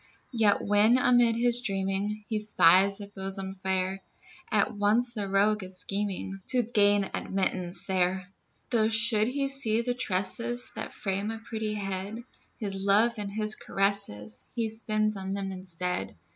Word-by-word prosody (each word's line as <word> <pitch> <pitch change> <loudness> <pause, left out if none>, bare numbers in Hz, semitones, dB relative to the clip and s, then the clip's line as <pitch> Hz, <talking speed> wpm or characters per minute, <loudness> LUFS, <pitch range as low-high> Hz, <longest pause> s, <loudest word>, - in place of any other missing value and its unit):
Yet 215 -4 +2
when, 210 +4 +4
amid 245 -2 +3
his 240 +1 +2
dreaming, 195 0 -2
He 215 -2 -2
spies 200 -1 +5
a 200 - -7
bosom 195 -1 -2
fair, 190 0 -1 0.5
At 245 - +1
once 220 +4 +1
the 205 -3 -4
rogue 205 +1 +2
is 185 0 -2
scheming 195 0 -3
To 250 -2 +2
gain 205 -3 +2
admittance 185 -2 -1
there; 185 -1 0 0.4
Though 220 -3 +2
should 220 -1 +3
he 275 +2 -1
see 235 -5 +1
the 245 +1 -2
tresses 235 +2 0
That - - -5
frame 200 0 -3
a 225 - -5
pretty 220 -1 -5
head, 200 +3 -5 0.3
His 205 -3 -3
love 210 +4 +3
and 205 -1 -4
his 215 +1 0
caresses 195 - -1
He 230 -2 -1
spends 215 -1 0
on 195 0 -4
them 195 -1 -4
instead. 180 -1 -3
205 Hz, 150 wpm, -27 LUFS, 195-225 Hz, 0.5 s, spies